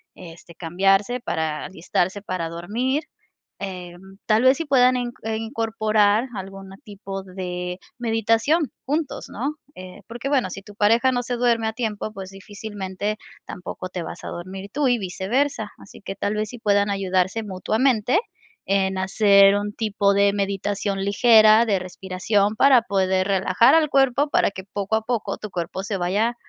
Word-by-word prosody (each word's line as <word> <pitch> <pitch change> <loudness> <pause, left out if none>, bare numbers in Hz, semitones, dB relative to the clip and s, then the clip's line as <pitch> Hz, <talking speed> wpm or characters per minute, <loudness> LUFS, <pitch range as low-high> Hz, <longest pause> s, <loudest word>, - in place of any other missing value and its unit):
este, 170 -1 -12
cambiarse 195 +7 +1
para 160 -7 -2
alistarse 190 +1 -2
para 185 -4 -3
dormir, 235 - -2 0.6
eh, 180 -3 -6 0.3
tal 220 +2 +3
vez 260 +1 +5
sí 330 - -3
puedan 255 -3 +4
in 240 -1 -3
eh, 220 0 -2
incorporar 220 -1 +1
algún 195 0 -8
tipo 195 -3 -7
de 180 -1 -5 0.2
meditación 230 +7 +1
juntos, 300 +2 -3
¿no?, 280 +7 -3 0.2
eh, 185 0 -10
porque, 240 +3 -6
bueno, 260 -9 +1
si 195 - -7
tu 205 0 -13
pareja 230 +5 +3
no 245 - 0
se 245 0 -3
duerme 235 -2 +1
a 220 - -2
tiempo, 215 -2 -3
pues, 190 -2 -8
difícilmente 205 +1 -5 0.3
tampoco 180 0 -7
te 180 -1 -5
vas - - -8
a - - -5
dormir 190 +3 -7
tú 285 +2 +1
y 245 -1 +3
viceversa, 205 +5 -1
así - - -14
que 195 - -6
tal 205 +1 -2
vez 215 0 -2
sí 245 - -9
puedan 205 -1 +2
ayudarse 190 +2 0
mutuamente 220 - +1 0.5
en 190 -1 +1
hacer 200 0 +5
un 205 0 -2
tipo 205 -3 +1
de 200 0 +3
meditación 200 0 -2
ligera, 215 +1 +6
de 200 -4 +1
respiración 190 +3 -1
para 265 0 +6
poder 190 -3 +1
relajar 195 - +4
al 315 -2 +3
cuerpo 275 +1 +2
para - - +2
que 190 -1 -8
poco 200 +1 -1
a - - -2
poco 220 -4 -2
tu 210 - -7
cuerpo 180 +2 -4
se 200 0 -3
vaya 205 +7 0
205 Hz, 165 wpm, -23 LUFS, 190-230 Hz, 0.6 s, ligera